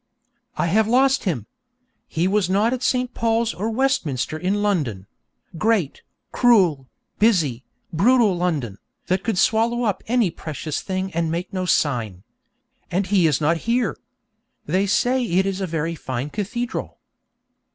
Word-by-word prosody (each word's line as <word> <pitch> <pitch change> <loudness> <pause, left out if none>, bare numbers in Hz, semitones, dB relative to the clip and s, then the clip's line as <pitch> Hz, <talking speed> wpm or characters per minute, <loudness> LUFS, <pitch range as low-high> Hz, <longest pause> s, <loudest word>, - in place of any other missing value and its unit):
I - - +1
have 210 +6 +2
lost 265 +3 +3
him! 140 - -1 0.6
He 165 +3 0
was 195 -2 +1
not 210 +5 +2
at 255 - -3
St. 250 -1 0
Paul's 230 0 0
or 210 +5 -3
Westminster 220 - 0
in 190 +5 -1
London 140 - -1 0.5
great, 215 -10 +1 0.3
cruel, 180 - +3 0.3
busy, 160 - +2 0.3
brutal 215 +3 +4
London, 150 - -2 0.3
that 185 +1 0
could 225 -5 -1
swallow 230 +5 +2
up 210 -5 -1
any 230 -6 +2
precious 155 -2 -5
thing 190 0 -3
and 165 0 0
make 170 +4 -4
no 185 -1 -2
sign. 115 - 0 0.7
And 185 +3 0
he 185 -3 +3
is 150 -4 +1
not 160 +2 +2
here! 240 -1 +1 0.7
They 185 +6 +1
say 250 +5 +2
it 190 -3 +1
is 195 0 -2
a 190 - -1
very 165 0 -2
fine 130 -2 -5
cathedral. 235 +4 -4
190 Hz, 145 wpm, -22 LUFS, 160-225 Hz, 0.7 s, brutal